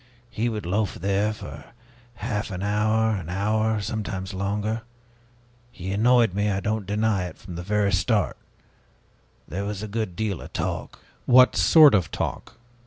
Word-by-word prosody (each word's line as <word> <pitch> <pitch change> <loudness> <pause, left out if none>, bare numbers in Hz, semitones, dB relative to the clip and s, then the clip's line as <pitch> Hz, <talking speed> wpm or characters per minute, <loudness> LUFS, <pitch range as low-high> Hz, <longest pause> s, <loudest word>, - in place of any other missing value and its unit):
He 115 +3 -1
would 105 -4 -4
loaf 100 +3 0
there 100 +3 0
for 110 - -9 0.5
half 105 0 -3
an 95 -1 -5
hour, 110 +2 +2
an 90 -4 -6
hour, 110 +3 0
sometimes 100 -2 -4
longer. 105 +3 -2 0.9
He 95 +2 -6
annoyed 115 0 +4
me, 105 +2 0
I 95 -1 0
don't 105 -1 -2
deny 105 -2 +1
it, 90 - -8
from 95 - -10
the 85 - -5
very 100 +2 +1
start. 105 +3 +1 1.1
There 95 +6 -4
was 105 0 -4
a - - -4
good 105 -3 -3
deal 105 -4 -2
of - - -11
talk." - - -3 0.3
"What 125 0 +6
sort 155 -4 +7
of 90 -5 +2
talk?" - - -4
105 Hz, 160 wpm, -25 LUFS, 95-110 Hz, 1.1 s, sort